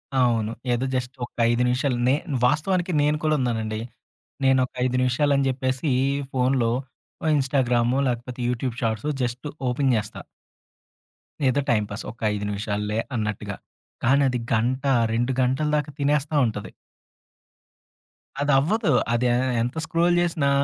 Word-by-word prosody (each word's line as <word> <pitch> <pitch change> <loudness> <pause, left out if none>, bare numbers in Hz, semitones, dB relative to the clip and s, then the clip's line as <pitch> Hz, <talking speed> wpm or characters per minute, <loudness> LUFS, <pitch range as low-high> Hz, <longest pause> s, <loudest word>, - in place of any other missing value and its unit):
అవును. 115 -4 +2 0.2
ఏదో 120 +2 0
జస్ట్ 125 0 -3
ఒక - - -17 0.2
5 120 +1 +1
నిమిషాలు. 125 +1 +1
నే 130 - +4 0.3
వాస్తవానికి, 175 +6 +1
నేను 150 +1 +2
కూడా 155 0 +2
ఉన్నానండి. 110 -3 -1 0.6
నేను 135 -1 +4
ఒక - - -16
5 125 0 0
నిమిషాలు 130 +3 +2
అని 140 - +1
చెప్పేసి, 130 +2 -1 0.4
ఫోన్‌లో 125 -2 +2 0.5
ఆహ్, 155 - +3
ఇన్స్టాగ్రాము, 125 -3 +1
లేకపోతే 125 0 -3
యూట్యూబ్ 125 0 -2
షాట్సు, 110 +5 -1
జస్టు 125 +3 -3 0.2
ఓపెన్ 130 +2 +1
జేస్తా. 105 -1 -3 1.3
ఏదో 130 +2 +2
టైమ్‌పాస్ 105 -2 -1
ఒక 115 - -19
5 105 0 -3
నిమిషాల్లే 105 +1 -2 0.2
అన్నట్టుగా. 105 -3 -3 0.5
కానది 130 0 +3
గంట, 125 +4 +1 0.3
2 120 +3 +1
గంటల 130 +4 +1
దాక 150 -1 -1
తినేస్తా 145 +1 +1
ఉంటది. 110 - -5 1.7
అది 145 0 +2
అవ్వదు. 200 - +1 0.2
అది 120 +1 +1
ఎ - - +3 0.3
ఎంత 120 +4 -2
స్క్రోల్ 170 +2 +2
జేసినా 165 -5 +1
125 Hz, 135 wpm, -24 LUFS, 115-140 Hz, 1.7 s, నే